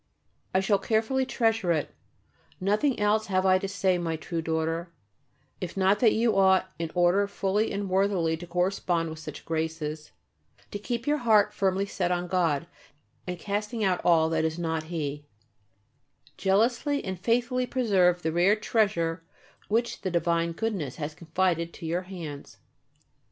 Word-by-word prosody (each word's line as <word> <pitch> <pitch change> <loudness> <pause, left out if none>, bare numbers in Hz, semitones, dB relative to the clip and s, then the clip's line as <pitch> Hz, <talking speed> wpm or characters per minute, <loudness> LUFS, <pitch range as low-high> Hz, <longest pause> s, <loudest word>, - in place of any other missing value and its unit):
I 190 - +2
shall 195 +1 +2
carefully 235 +4 0
treasure 225 -7 +1
it. 155 -3 -1 0.7
Nothing 210 +8 +1
else 210 +1 +2
have 185 -1 +1
I 185 0 +5
to 195 - -3
say, 190 -2 +1
my 165 -2 -2
true 165 +1 -4
daughter, 165 +1 -2 0.7
if 180 +1 -6
not 195 +2 +3
that 225 -2 +5
you 230 0 +2
ought, 190 -1 +4
in 165 -1 -2
order 180 +3 +3
fully 200 +2 0
and 200 0 -3
worthily 185 -4 +1
to 175 +2 -9
correspond 175 -2 0
with 160 - -8
such 155 -2 -9
graces, 160 -1 -3 0.6
to 205 - -4
keep 235 +2 -3
your 295 +1 +1
heart 215 -4 +4
firmly 195 -1 +1
set 180 -3 -2
on 175 0 0
God, 170 -5 +1 0.6
and 180 0 -3
casting 210 +5 -3
out 185 -2 +1
all 165 -2 +4
that 160 -1 0
is 160 0 -1
not 160 -2 -2
He, 145 -3 -4 1.1
jealously 235 +9 +1
and 190 -2 -4
faithfully 245 +4 +1
preserve 190 -9 +2
the 160 - 0
rare 180 +5 +4
treasure 190 -7 0 0.4
which 230 +3 0
the 185 - -2
divine 170 -1 0
Goodness 185 - -3
has 150 0 -5
confided 170 +1 -1
to - - -9
your 170 +3 -1
hands. 160 -7 -8
185 Hz, 155 wpm, -27 LUFS, 165-210 Hz, 1.1 s, I